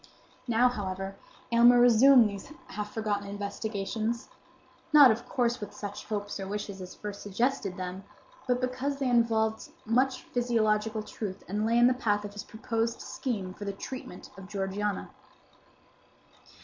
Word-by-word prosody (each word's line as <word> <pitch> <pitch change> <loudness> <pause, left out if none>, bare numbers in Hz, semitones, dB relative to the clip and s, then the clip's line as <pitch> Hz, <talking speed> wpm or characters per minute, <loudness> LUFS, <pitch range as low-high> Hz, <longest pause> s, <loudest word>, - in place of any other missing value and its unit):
Now, 240 +1 +4
however, 195 -4 -3 0.4
Aylmer 240 +1 +7
resumed 245 +1 +7
these 200 +6 -8 0.2
half 210 0 -5
forgotten 205 -2 -2
investigations; 215 +4 -3 0.6
not, 290 -5 +9
of 225 +2 -4
course, 240 -1 +1
with 205 -1 -7
such 205 -1 -6
hopes 205 -1 -4
or 195 - -4
wishes 200 -1 -5
as 185 0 -8
first 205 -1 -7
suggested 205 -1 -1
them; 185 +1 -5 0.4
but 250 0 +1
because 255 +3 -2
they 275 -1 -1
involved 220 -2 +2 0.2
much 255 +3 +1
physiological 220 -3 0
truth 200 -2 -6
and 210 +3 -1
lay 230 +1 +3
in 240 - +6
the 250 - +5
path 210 -5 0
of 205 - -7
his 205 - -6
proposed 230 +1 -2
scheme 200 -8 -4
for 205 - -9
the 200 - -3
treatment 200 -3 -8
of 190 -1 -10
Georgiana. 200 0 -3
215 Hz, 150 wpm, -29 LUFS, 200-240 Hz, 0.6 s, not